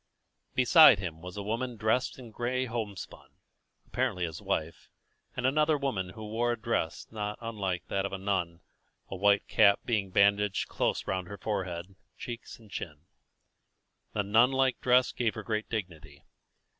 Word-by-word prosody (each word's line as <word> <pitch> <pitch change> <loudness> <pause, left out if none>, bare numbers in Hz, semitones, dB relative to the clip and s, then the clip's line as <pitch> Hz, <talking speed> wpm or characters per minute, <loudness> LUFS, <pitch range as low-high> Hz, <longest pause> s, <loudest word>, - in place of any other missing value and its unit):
Beside 130 - +8
him 85 -4 -6
was 90 +2 -8
a 100 - -4
woman 115 +3 -3
dressed 110 +4 0
in 120 -4 -11
gray 125 +3 -1
homespun, 110 -5 -6 0.6
apparently 90 -1 -1
his 80 -2 -7
wife, 80 +1 -3 0.5
and 125 - -2
another 150 +3 +3
woman 130 -10 -2
who 110 +3 -9
wore 120 +3 0
a 120 - -6
dress 110 -7 -2
not 105 -1 -4
unlike 100 -7 -3
that 95 - -1
of 100 - -3
a 95 - -3
nun, 95 -4 -2 0.5
a - - -3
white 100 +1 +3
cap 100 0 +5
being 105 -5 0
bandaged 100 +1 +3
closely - - -1
round 95 -1 -2
her 100 - -8
forehead, 95 -3 -4 0.2
cheeks 120 -1 -7
and 110 -3 -18
chin. 75 -6 -6 1.1
The 105 - 0
nun 110 +5 +5
like 135 -1 +1
dress 125 0 +4
gave 115 -3 -1
her 110 - -6
great 110 0 -2
dignity. 85 -9 -6
105 Hz, 160 wpm, -29 LUFS, 95-120 Hz, 1.1 s, Beside